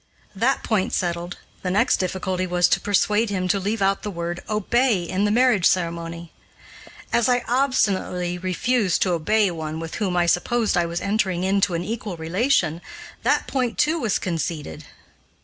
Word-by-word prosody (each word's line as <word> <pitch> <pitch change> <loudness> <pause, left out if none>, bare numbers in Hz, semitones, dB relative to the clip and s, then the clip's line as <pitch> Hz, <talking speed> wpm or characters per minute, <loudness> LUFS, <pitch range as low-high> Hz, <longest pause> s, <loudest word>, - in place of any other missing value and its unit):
That 240 +7 +1
point 215 -4 0
settled, 175 0 -2 0.2
the 185 - -2
next 190 +3 +3
difficulty 185 0 -2
was 175 0 +3
to - - +3
persuade 210 +2 +1
him 185 -2 -1
to 200 - +2
leave 205 +2 -1
out 195 0 +1
the 210 - -4
word 170 -2 -4
"obey" 215 -1 +1
in 185 +4 -1
the - - +2
marriage 230 -4 +4
ceremony. 170 -1 -2 0.8
As 235 +1 +3
I 245 -1 +2
obstinately 200 -9 0
refused 190 +2 +1
to 185 - 0
obey 200 +5 +2
one 160 -1 -5
with 165 0 -6
whom 185 -3 0
I 175 - +3
supposed 215 +6 +1
I 175 -1 +2
was 170 +1 -3
entering 195 -3 0
into 195 -1 +1
an 170 - -2
equal 210 -2 -5
relation, 170 - +1 0.4
that - - +1
point, 250 -4 -2
too, 320 +2 +2
was 225 -8 0
conceded. 165 - -4
190 Hz, 165 wpm, -23 LUFS, 175-215 Hz, 0.8 s, marriage